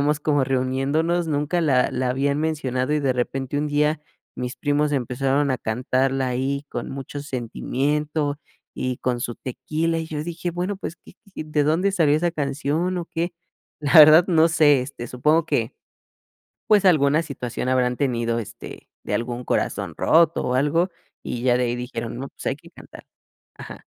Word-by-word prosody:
llevamos 150 Hz, +1 st, +1 dB
como 145 Hz, -2 st, +2 dB
reuniéndonos, 135 Hz, +6 st, 0 dB
nunca 150 Hz, +3 st, 0 dB
la 135 Hz, -6 st, +2 dB
la 125 Hz, 0 st, -1 dB
habían 140 Hz, +2 st, 0 dB
mencionado 145 Hz, -4 st, -1 dB
y 150 Hz, -, +1 dB
de 135 Hz, -2 st, +1 dB
repente 130 Hz, +3 st, -2 dB
un 150 Hz, -, -1 dB
día 150 Hz, +1 st, +1 dB, 0.4 s
mis 125 Hz, 0 st, -4 dB
primos 145 Hz, 0 st, +1 dB
empezaron 135 Hz, +2 st, 0 dB
a 130 Hz, -, -2 dB
cantarla 130 Hz, +4 st, 0 dB
ahí, 135 Hz, +3 st, -2 dB
con 120 Hz, -, -5 dB
mucho 135 Hz, +1 st, -6 dB
sentimiento 145 Hz, +3 st, -2 dB, 0.4 s
y 130 Hz, -1 st, -2 dB
con 125 Hz, -1 st, -2 dB
su 120 Hz, -1 st, -4 dB
tequila 155 Hz, +6 st, -2 dB
y 160 Hz, -, -4 dB
yo 150 Hz, -1 st, -4 dB
dije, 170 Hz, +1 st, -4 dB
bueno, 180 Hz, +4 st, -3 dB
pues, 185 Hz, -, -6 dB
y, -, -, -16 dB, 0.2 s
y, -, -, -4 dB
¿de 150 Hz, -1 st, 0 dB
dónde 170 Hz, +7 st, +2 dB
salió 155 Hz, -5 st, +3 dB
esa 170 Hz, +2 st, 0 dB
canción 150 Hz, +5 st, -1 dB
o 170 Hz, -, -3 dB
qué? 170 Hz, +1 st, -2 dB, 0.5 s
La 145 Hz, +1 st, +2 dB
verdad 155 Hz, +3 st, +9 dB
no 165 Hz, -2 st, +4 dB
sé, 150 Hz, -4 st, +4 dB
este 125 Hz, -2 st, -6 dB
supongo 150 Hz, +7 st, +1 dB
que, -, -, 0 dB, 0.9 s
pues, 210 Hz, -2 st, +4 dB
alguna 155 Hz, -4 st, +4 dB
situación 125 Hz, -4 st, -4 dB
habrán 125 Hz, -1 st, +1 dB
tenido, 120 Hz, -4 st, 0 dB
este, 115 Hz, -, -9 dB
de -, -, -2 dB
algún 120 Hz, +1 st, -3 dB
corazón -, -, -1 dB
roto 165 Hz, 0 st, +3 dB
o 125 Hz, -, 0 dB
algo, 155 Hz, +7 st, +2 dB, 0.3 s
y 120 Hz, -, -4 dB
ya 125 Hz, -1 st, +3 dB
de 125 Hz, -, +1 dB
ahí 120 Hz, 0 st, -1 dB
dijeron: 120 Hz, -1 st, -5 dB
"No, 135 Hz, -, -5 dB
pues, -, -, -13 dB
hay -, -, 0 dB
que -, -, -17 dB
cantar". -, -, -14 dB, 0.5 s
Ajá, -, -, -11 dB
145 Hz, 175 wpm, -23 LUFS, 130-155 Hz, 0.9 s, verdad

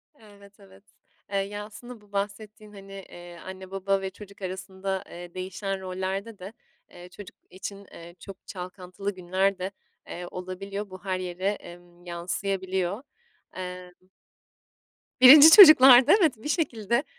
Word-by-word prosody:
Evet, 205 Hz, -4 st, -19 dB
evet. 195 Hz, 0 st, -19 dB, 0.5 s
Eee, 200 Hz, -, -1 dB
ya, 205 Hz, +1 st, -4 dB
aslında 240 Hz, +2 st, -12 dB
bu 205 Hz, -1 st, -24 dB
bahsettiğin, 210 Hz, +1 st, -6 dB
hani, 195 Hz, 0 st, -13 dB
eee, 175 Hz, -3 st, -12 dB
anne 190 Hz, 0 st, -10 dB
baba 195 Hz, 0 st, -1 dB
ve 190 Hz, -, -4 dB
çocuk 200 Hz, 0 st, -15 dB
arasında, 190 Hz, +1 st, -5 dB
eee, 175 Hz, 0 st, -11 dB
değişen 190 Hz, +1 st, -5 dB
rollerde 190 Hz, +3 st, -5 dB
de, 190 Hz, +4 st, -10 dB, 0.4 s
eee, 175 Hz, 0 st, -13 dB
çocuk 205 Hz, +1 st, -13 dB
için, 200 Hz, +2 st, -9 dB
eee, 170 Hz, +1 st, -13 dB
çok 195 Hz, +1 st, -13 dB
çalkantılı 185 Hz, +1 st, -7 dB
günler 190 Hz, +2 st, -1 dB
de, 190 Hz, +2 st, -4 dB, 0.4 s
eee, 175 Hz, +1 st, -8 dB
olabiliyor. 195 Hz, +3 st, -7 dB
Bu 185 Hz, -1 st, -12 dB
her 185 Hz, -1 st, -2 dB
yere, 185 Hz, +1 st, -4 dB
emm, 175 Hz, -3 st, -10 dB
yansıyabiliyor. 190 Hz, +3 st, -3 dB, 0.5 s
Emm 180 Hz, 0 st, -10 dB, 1.1 s
1'nci 290 Hz, +5 st, +10 dB
çocuklarda 270 Hz, -, +9 dB
evet, 310 Hz, -6 st, +3 dB
bir 295 Hz, +7 st, -8 dB
şekilde, 235 Hz, -, -1 dB
195 Hz, 135 wpm, -25 LUFS, 185-205 Hz, 1.1 s, 1'nci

